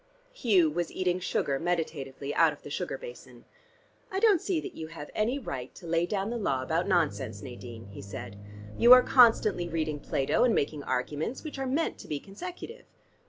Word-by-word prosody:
Hugh 195 - +3
was 175 +2 -2
eating 180 -1 0
sugar 140 -6 -1
meditatively 150 -5 -3
out 165 -2 +5
of 145 - -16
the 145 - -9
sugar - - -3
basin. - - -11 0.7
"I 380 - -1
don't 410 -5 +4
see 365 -4 0
that - - -7
you 160 - -7
have 160 -2 -9
any 230 +6 0
right 130 - -6
to 180 - -12
lay 170 +1 +1
down 200 +2 -2
the 240 - -2
law 135 -10 0
about 165 +6 0
nonsense, 110 - 0
Nadine," 120 -3 -9
he 100 0 -10
said. 100 0 -8 0.4
"You 240 +1 +9
are 255 0 +8
constantly 215 -8 +4
reading 155 -2 -2
Plato, 135 -1 +1
and 245 -3 +4
making 145 +1 -1
arguments, 145 - -2
which 300 -3 -6
are 270 - -2
meant 290 +6 -1
to - - -10
be 150 - -3
consecutive." 360 - -9
170 Hz, 190 wpm, -29 LUFS, 140-240 Hz, 0.7 s, You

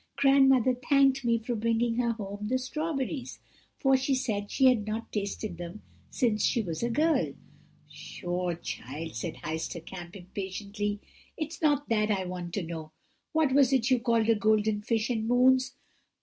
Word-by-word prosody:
Grandmother 270 -2 +5 0.2
thanked 275 -1 +4
me 235 -1 +3
for 230 +2 -3
bringing 230 +1 0
her 235 -1 +1
home 205 -1 -6
the 255 +3 +1
strawberries, 275 0 -3 0.4
for 270 -1 +3
she 265 +1 +1
said 215 -6 -2
she 265 - +2
had 240 -5 +4
not 220 +2 -4
tasted 200 -2 -3
them 175 +4 -7 0.3
since 220 -4 +1
she 240 - +2
was 165 -4 -4
a 235 - 0
girl.' 310 +7 +1 0.5
"'Pshaw, 175 -1 -4
child,' 160 0 -6
said 115 - -4
Heister 160 +1 -4
Kamp 175 -1 -9
impatiently; 200 +2 -4 0.4
'it 310 -2 -2
is - - -10
not 290 -2 +2
that 215 -2 +2
I 195 -3 0
want 180 -1 -5
to 200 - -1
know. 160 -2 -7 0.4
What 315 -4 +2
was 275 -2 +5
it 260 -1 +2
you 255 - +4
called 230 -2 +2
a 230 - +6
golden 215 0 +2
fish 225 +1 0
and 220 -2 -1
moons?' 255 +2 +4
225 Hz, 170 wpm, -29 LUFS, 200-260 Hz, 0.5 s, a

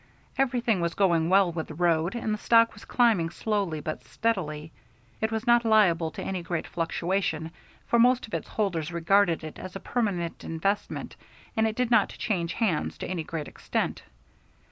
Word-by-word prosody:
Everything 245 -7 +1
was 170 0 -1
going 170 -4 +2
well 190 -1 +5
with 160 -1 -4
the 155 - -9
road, 170 +3 +1
and 225 -2 -1
the - - -1
stock 230 0 +4
was - - -13
climbing 220 -9 +3
slowly 195 -4 -2
but 155 +1 -5
steadily. 160 -9 -2 0.5
It 220 +1 0
was 220 +1 -2
not 240 -1 +5
liable 190 -8 +4
to - - -6
any 190 -2 -3
great 170 -1 -3
fluctuation, 165 -1 -2 0.3
for 235 - +2
most 250 +1 +4
of 220 - -17
its - - -3
holders 175 -7 -2
regarded 170 0 +2
it 155 - -8
as 185 0 -8
a - - -4
permanent 195 -10 -2
investment 195 +6 -2 0.4
and 220 0 +3
it 220 - -3
did 250 0 0
not 240 - +5
change 175 -5 -2
hands 195 -10 -1
to - - -5
any 175 -3 -3
great 155 -2 -5
extent. - - -3
185 Hz, 180 wpm, -27 LUFS, 165-220 Hz, 0.5 s, well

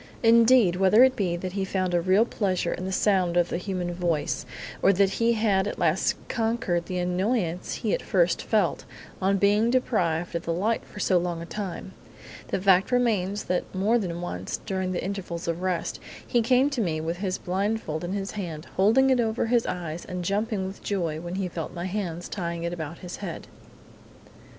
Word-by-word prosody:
Indeed, 230 -4 +6
whether 195 +5 +6
it 260 0 +4
be 180 -4 0
that 185 +1 -4
he 195 +1 -2
found 185 -1 -1
a 175 - +3
real 190 +6 +4
pleasure 185 -7 -1
in 185 - -5
the 190 - -3
sound 185 -3 +2
of 175 0 +3
the 170 - -2
human 180 -2 -3
voice, 170 -4 -1 0.3
or 195 - +6
that 195 +1 +3
he 230 +2 +2
had 205 -3 +2
at - - -4
last 170 +2 +2
conquered 225 -7 -1
the 185 - -3
annoyance 180 0 -1
he 215 - -1
at - - 0
first 175 -2 +2
felt 210 -6 +1 0.4
on 195 +1 +2
being 205 +3 +3
deprived 175 -10 0
of 170 0 -2
the 165 - 0
light 215 +7 0
for - - -11
so 185 -3 +3
long 175 -1 -2
a 170 - -6
time, 195 0 -6 0.5
the - - -1
fact 190 +2 +4
remains 210 -5 +1
that 180 - 0
more 210 +6 +2
than 175 -4 -4
once, 95 - -4
during 190 -1 -2
the 180 - -2
intervals 180 -4 -4
of 170 +1 -2
rest, 185 -2 -2 0.3
he 240 - +2
came 255 +4 +3
to 265 -4 -1
me 165 -6 -1
with 165 +2 -3
his 185 0 -2
blindfold 190 -4 -2
in 175 +2 -3
his 200 -1 -3
hand, 170 -6 -5
holding 235 +8 +5
it 255 - +3
over 225 0 0
his 235 0 +2
eyes, 170 -2 -4
and 180 -1 -5
jumping 205 +1 -1
with 190 +1 -7
joy 170 -6 -2
when 175 +1 -5
he 190 -1 -1
felt 165 -1 -6
my 175 +1 -4
hands 180 -3 -3
tying 170 -3 -4
it 170 0 -2
about 165 -1 -5
his 180 - -6
head. 185 -5 -6
185 Hz, 200 wpm, -26 LUFS, 175-210 Hz, 0.5 s, Indeed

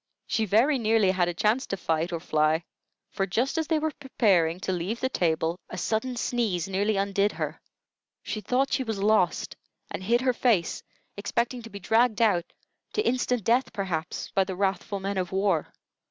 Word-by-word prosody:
She 220 - 0
very 245 +8 +3
nearly 220 -4 +3
had 180 -2 +1
a 175 - -1
chance 215 +8 +1
to 195 - -3
fight 165 0 -1
or 170 - -2
fly; 155 0 +1 0.5
for 195 - -1
just 240 - 0
as 320 - -1
they 320 - +2
were 315 0 0
preparing 195 - +1
to 190 - -2
leave 185 +6 -2
the 260 - 0
table, 165 -4 0
a - - -6
sudden 235 +3 -1
sneeze 225 -8 -1
nearly 200 +2 0
undid 200 +1 +1
her. - - -4 0.6
She 215 - -4
thought 260 +5 0
she 265 - +1
was 220 -4 -3
lost, 200 -4 +1 0.4
and - - -4
hid 235 +6 +2
her 255 -1 +2
face, 225 -9 +1 0.4
expecting 235 +4 -1
to 230 - -10
be 200 - -8
dragged 225 +2 +2
out 200 -7 +2 0.4
to 425 - 0
instant 250 -2 +1
death, 240 +6 +2
perhaps 180 -5 -3
by 195 - +3
the 190 0 -5
wrathful 195 +1 -1
men 195 0 -2
of 180 -1 -3
war. 190 -4 +1
200 Hz, 185 wpm, -27 LUFS, 180-235 Hz, 0.6 s, very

